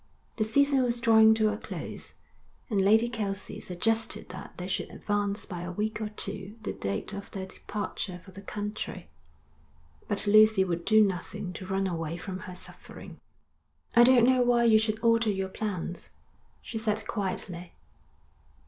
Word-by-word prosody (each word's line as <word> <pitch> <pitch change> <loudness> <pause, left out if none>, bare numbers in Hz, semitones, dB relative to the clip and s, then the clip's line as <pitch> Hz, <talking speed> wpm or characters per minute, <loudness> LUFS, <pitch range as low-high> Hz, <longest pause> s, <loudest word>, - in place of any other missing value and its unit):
The 220 - +2
season 275 +5 +3
was 240 -1 0
drawing 220 -1 +6
to 215 -1 +2
a 210 - -6
close, - - -7 0.6
and 200 -2 +2
Lady 220 +4 +5
Kelsey 205 -4 -4
suggested 225 +5 -1
that - - -9
they - - -5
should - - -2
advance 205 0 -2
by 175 -3 -6
a 175 0 -5
week 215 +4 -2
or 215 - -2
two 205 -1 -6
the - - -3
date 100 - -3
of 200 0 -7
their 190 -1 -5
departure 190 -1 -5
for 190 - -13
the 195 +2 -10
country; 205 -3 -5 1.0
but 200 0 0
Lucy 215 -1 +6
would 170 -2 -3
do 215 0 +6
nothing 190 0 -4
to 185 - -8
run 195 0 0
away 165 -2 -3
from 185 +1 -6
her 180 - -8
suffering. - - -11 0.8
'I 240 - +9
don't 245 -2 +6
know 255 0 +4
why 240 -1 +3
you 220 -2 +6
should 215 0 0
alter 230 -1 +3
your 190 -1 -1
plans,' 190 -4 -4 0.5
she 225 - -5
said 215 -1 -1
quietly. 185 -4 -4
210 Hz, 165 wpm, -28 LUFS, 190-220 Hz, 1.0 s, I